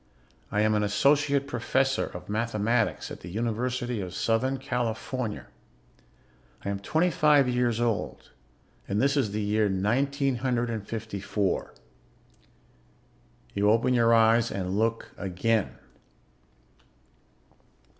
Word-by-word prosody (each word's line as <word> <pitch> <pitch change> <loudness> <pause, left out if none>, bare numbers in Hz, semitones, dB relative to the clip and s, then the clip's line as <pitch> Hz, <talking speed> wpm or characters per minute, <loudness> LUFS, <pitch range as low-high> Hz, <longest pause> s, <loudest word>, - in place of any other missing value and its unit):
I 105 - +1
am 110 0 +3
an 105 - +2
associate 140 +7 +2
professor 135 +2 0
of - - -9
mathematics 115 +1 0
at - - -7
the 85 - -9
University 120 +3 -2
of 90 0 -6
Southern 130 +6 +1
California. 125 -2 -3 1.2
I - - -1
am 100 -1 -2
twenty 160 - +1
five 145 -3 +4
years 125 -2 +1
old, 115 -3 -2 0.6
and 100 - -1
this 140 +3 +2
is 135 -7 +1
the 105 +1 -2
year 105 0 +1
nineteen 135 +8 0
hundred 120 -1 -1
and 110 -3 -5
fifty 110 -3 -5
four._ 100 -1 -2 1.7
You 100 +1 +2
open 115 +4 +3
your 115 -1 +4
eyes 115 0 +4
and 95 -1 -3
look 115 +2 -1
again. 100 +3 0
115 Hz, 120 wpm, -27 LUFS, 105-125 Hz, 1.7 s, five